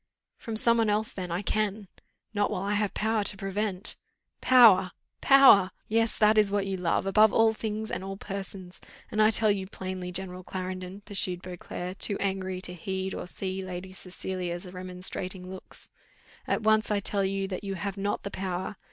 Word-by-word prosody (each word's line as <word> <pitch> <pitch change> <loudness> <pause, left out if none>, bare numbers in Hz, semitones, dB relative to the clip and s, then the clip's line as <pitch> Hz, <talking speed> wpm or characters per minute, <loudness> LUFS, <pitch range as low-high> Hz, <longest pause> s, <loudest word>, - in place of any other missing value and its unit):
"From 225 - -6
some 235 +1 +3
one 225 -2 +2
else 210 +1 0
then 185 -2 -5
I 175 +4 -2
can." 210 -1 -1 0.5
"Not 205 -1 +1
while 190 -3 -3
I 200 +1 -1
have 210 -1 0
power 220 0 +1
to 200 - +4
prevent." 195 0 -2 0.4
"Power! 210 -8 +6 0.3
power! 275 -6 +8
power! - - -30 0.2
Yes, 225 +1 +1
that 215 0 +5
is 205 -2 +3
what 200 -1 +1
you 195 0 -2
love, 180 0 0
above 215 +2 +5
all 225 0 +4
things 220 0 -4
and - - -3
all 195 0 -6
persons, 195 -2 -7 0.3
and 215 - +1
I 215 - +6
tell 220 -1 +4
you 195 -2 -2
plainly, 185 -1 -5
General 185 0 -2
Clarendon," 185 +1 -6
pursued 185 -3 -3
Beauclerc, 180 +1 -7
too 200 - 0
angry 190 -2 -2
to 180 - -3
heed 190 +2 -4
or - - -5
see 190 +1 -3
Lady 185 0 -7
Cecilia's 180 -1 -5
remonstrating 185 0 -6
looks, 190 - -11 0.6
"at - - 0
once 220 0 +3
I 210 -1 +1
tell 200 0 -1
you 195 0 -1
that 185 0 -5
you 195 -1 -3
have 200 +1 -4
not 200 +1 -2
the 200 - -5
power. 190 +1 -4
195 Hz, 185 wpm, -28 LUFS, 185-210 Hz, 0.6 s, power